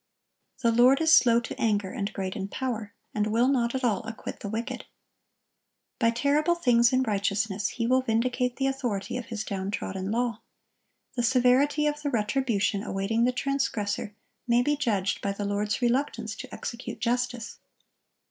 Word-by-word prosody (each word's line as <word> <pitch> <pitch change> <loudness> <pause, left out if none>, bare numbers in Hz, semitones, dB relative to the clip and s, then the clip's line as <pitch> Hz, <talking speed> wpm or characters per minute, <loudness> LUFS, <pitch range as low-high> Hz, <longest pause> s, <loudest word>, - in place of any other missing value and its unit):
"The 230 - +4
Lord 245 +4 +5
is 320 0 +4
slow 235 -5 +6
to 230 - -7
anger, 205 -4 +1
and 200 +1 -3
great 190 -1 -4
in 195 -3 -3
power, 225 -3 -4 0.2
and 210 0 0
will 230 +3 +2
not 245 -3 +1
at 260 - -2
all 215 -6 +1
acquit 225 -1 -7
the 205 - -5
wicked."(1073) 235 +4 -4 1.1
By 230 - +4
terrible 290 +8 +2
things 240 -7 +4
in 260 0 +3
righteousness 200 -2 0
He 230 - -3
will 255 +2 +3
vindicate 250 +1 0
the 270 - -1
authority 245 -8 -2
of 245 - -5
His 220 -2 -4
downtrodden 190 -1 -3
law. 230 0 -1 0.7
The 245 - 0
severity 260 +5 +3
of 295 0 -1
the 290 - -1
retribution 215 -3 0
awaiting 210 +4 0
the 250 - +3
transgressor 240 -7 -2 0.3
may 240 +1 +4
be 295 +3 +2
judged 215 -10 0
by 200 - -1
the 205 +1 -4
Lord's 205 +4 -1
reluctance 235 -3 0
to - - -8
execute 240 +2 -6
justice. 245 -1 -2
235 Hz, 165 wpm, -27 LUFS, 210-255 Hz, 1.1 s, slow